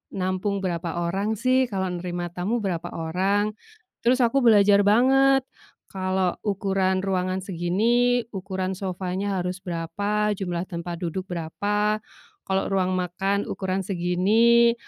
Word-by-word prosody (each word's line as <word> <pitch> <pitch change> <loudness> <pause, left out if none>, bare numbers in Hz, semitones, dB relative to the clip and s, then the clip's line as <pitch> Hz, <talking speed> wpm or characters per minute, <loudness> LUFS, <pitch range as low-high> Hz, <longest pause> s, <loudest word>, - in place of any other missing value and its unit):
nampung 185 +1 -1
berapa 170 -2 -2 0.2
orang 195 +5 -1
sih, 255 +3 +3
kalau 190 -3 -2
nerima 175 0 -4
tamu 205 +7 -1
berapa 175 -3 -2
orang. 190 +6 0 0.5
Terus 250 +2 +3
aku 240 +4 +3
belajar 205 -4 +6
banget, 270 +4 +5 0.5
kalo 185 -1 -1
ukuran 190 -2 0
ruangan 185 -1 -1
segini, 225 +8 +1
ukuran 190 -1 -3
sofanya 190 +1 -2
harus 180 +1 -3
berapa, 200 +5 -1
jumlah 175 -3 -2
tempat 170 0 -5
duduk 180 +2 -3
berapa. 205 +5 -1 0.5
Kalo 190 0 0
ruang 185 -1 +1
makan 190 +3 -1
ukuran 190 0 -3
segini, 210 +7 +3
190 Hz, 120 wpm, -24 LUFS, 180-210 Hz, 0.5 s, belajar